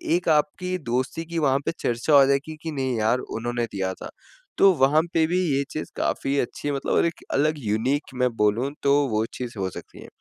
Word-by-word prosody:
एक 175 -1 0
आपकी 160 +4 +1
दोस्ती 130 +7 -1
की 170 0 -6
वहाँ 140 -3 +2
पे - - +1
चर्चा 120 +6 0
हो 140 -1 +8
जाएगी 140 +3 0
कि 165 - -3
नहीं 130 -4 -2
यार 110 +3 +2
उन्होंने 120 0 -3
दिया 95 -1 -2
था, - - -9 0.5
तो 195 - +7
वहाँ 145 +1 +4
पे 160 -1 +3
भी 180 +2 0 0.2
ये 140 - +1
चीज़ 155 - -5
काफ़ी 140 +1 -1
अच्छी 145 +3 -3
मतलब 140 -1 -2
और - - +3
एक 170 - -3
अलग 155 +3 +2
यूनिक 125 +5 -1
मैं 125 - +4
बोलूँ 110 +6 +1
तो 140 0 +4 0.2
वो 110 0 0
चीज़ 125 -2 -5
हो 95 -1 -1
सकती - - -11
है। - - -11
135 Hz, 210 wpm, -24 LUFS, 120-155 Hz, 0.5 s, हो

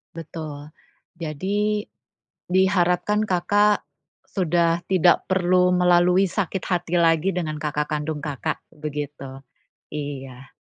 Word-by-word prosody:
Betul. 155 -2 -8 0.5
Jadi, 200 +7 -1 0.7
diharapkan 190 +2 +2
Kakak, 205 +3 +2 0.5
sudah 170 -2 +2
tidak 180 -2 +3
perlu 180 -1 +3
melalui 180 +1 +4
sakit 190 -1 -2
hati 175 -1 -1
lagi 170 +2 +3
dengan 155 -4 -3
kakak 150 -1 -1
kandung 150 +1 -2
Kakak, 145 -4 -3
begitu. 145 -3 -6 0.5
Iya. 135 -3 -7
175 Hz, 95 wpm, -23 LUFS, 150-185 Hz, 0.7 s, melalui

